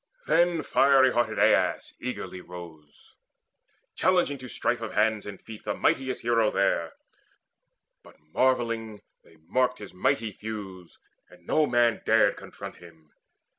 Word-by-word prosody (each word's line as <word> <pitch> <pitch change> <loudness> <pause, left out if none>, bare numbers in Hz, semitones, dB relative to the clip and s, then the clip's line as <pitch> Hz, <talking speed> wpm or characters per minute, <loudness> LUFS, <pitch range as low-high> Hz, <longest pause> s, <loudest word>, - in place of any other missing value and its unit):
Then 170 -2 +2
fiery 135 -2 +4
hearted 115 -2 0
Aias - - +2
eagerly 90 - -5
Rose, 85 -5 -13 0.8
challenging 175 -7 +2
to 130 -1 -9
strife 120 0 -1
of 115 - -5
hands 110 0 +1
and 100 -2 -8
feet 110 -1 -11
The - - -2
mightiest 130 -1 0
hero 115 -2 +3
there; 85 -4 0 1.1
but - - -18 0.2
marvelling 115 -4 0 0.2
They 80 - -21
marked 125 +7 +1
his 105 -4 -10
mighty 115 +3 0
thews, 100 -5 -8 0.3
and 90 -1 -19
no 155 - +2
man 120 -2 +2
dared - - +4
Confront - - -10
him. 80 -3 -17
110 Hz, 130 wpm, -27 LUFS, 95-130 Hz, 1.1 s, fiery